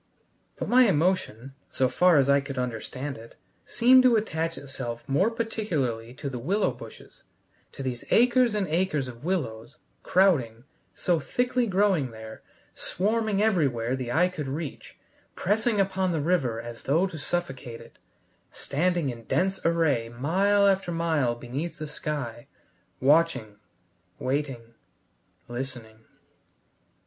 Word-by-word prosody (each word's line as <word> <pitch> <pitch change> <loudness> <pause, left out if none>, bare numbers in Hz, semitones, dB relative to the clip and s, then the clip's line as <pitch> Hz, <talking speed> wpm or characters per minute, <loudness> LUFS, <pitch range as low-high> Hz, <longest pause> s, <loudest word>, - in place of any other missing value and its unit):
But - - -4
my 250 0 +6
emotion, 150 - 0 0.2
so 130 - +1
far 180 +3 +4
as 135 -1 +4
I 140 0 +4
could 135 -1 -7
understand 125 +2 -4
it, 115 +1 -14 0.3
seemed 255 +2 +6
to 250 -2 +5
attach 165 -6 -1
itself 120 -4 -6
more 165 +11 +2
particularly 165 - -2
to 140 - -6
the 130 -3 -4
willow 195 - +1
bushes, - - -13 0.5
to 135 - -7
these 125 -2 -4
acres 245 -1 +4
and 200 -3 0
acres 155 -5 0
of 120 +1 -10
willows, 145 -11 -3 0.2
crowding, 135 - +2 0.3
so 175 -2 +1
thickly 245 - 0
growing 190 - +2
there, 110 -1 -10 0.3
swarming 215 +1 0
everywhere 135 - +1
the 125 -2 -4
eye 175 +7 +4
could 160 -6 -5
reach, 145 +2 -6 0.4
pressing 215 +3 +1
upon 190 -1 +1
the 165 - 0
river 145 -8 0
as 120 0 -8
though 160 +7 +2
to 165 -5 -6
suffocate 135 -8 -4
it, - - -16 0.5
standing 170 +1 -1
in 115 -2 -8
dense 190 +1 0
array 155 -9 +1
mile 190 +12 +2
after 195 -2 +2
mile 160 -8 +1
beneath 130 +8 -5
the 155 - -5
sky, 145 -6 -5 0.5
watching, 135 -7 +2 0.6
waiting, 130 -4 -3 0.7
listening. 120 -3 -7
150 Hz, 135 wpm, -26 LUFS, 125-190 Hz, 0.7 s, my